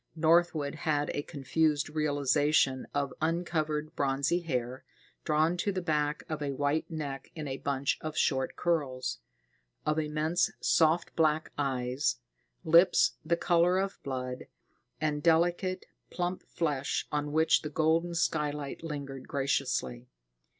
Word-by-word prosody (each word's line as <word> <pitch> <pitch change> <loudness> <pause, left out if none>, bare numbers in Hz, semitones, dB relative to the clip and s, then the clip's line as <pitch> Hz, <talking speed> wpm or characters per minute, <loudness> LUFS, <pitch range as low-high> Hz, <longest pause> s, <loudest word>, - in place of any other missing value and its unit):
Northwood 160 -2 +3
had 150 -2 -1
a 145 - -1
confused 150 0 0
realization 145 -2 +1
of 140 -2 -1
uncovered 155 -2 -1
bronzy 140 +4 +1
hair, 130 -6 -3 0.4
drawn 155 +3 +2
to 200 +3 0
the 190 - -2
back 150 -3 -1
of 155 -1 -4
a 140 -1 -2
white 145 +3 0
neck 145 -4 -5
in 155 -2 -5
a 135 0 -3
bunch 140 -1 -1
of 155 0 -5
short 130 -2 +1
curls; 130 -7 -1 0.7
of 150 +1 +1
immense 155 +3 +1
soft 165 +1 +2
black 155 -1 +2
eyes; 130 -1 0 0.5
lips 170 +3 +5
the 170 - +1
color 175 +2 +3
of 195 +1 -2
blood, 130 -2 -5 0.5
and 150 -1 -1
delicate, 175 +3 +2 0.2
plump 180 +1 -2
flesh 145 -5 -1
on 150 0 -1
which 160 +2 +3
the 150 - -5
golden 165 +3 +1
skylight 150 -3 -1
lingered 140 -4 -6
graciously. 130 -3 -1
150 Hz, 130 wpm, -30 LUFS, 140-165 Hz, 0.7 s, lips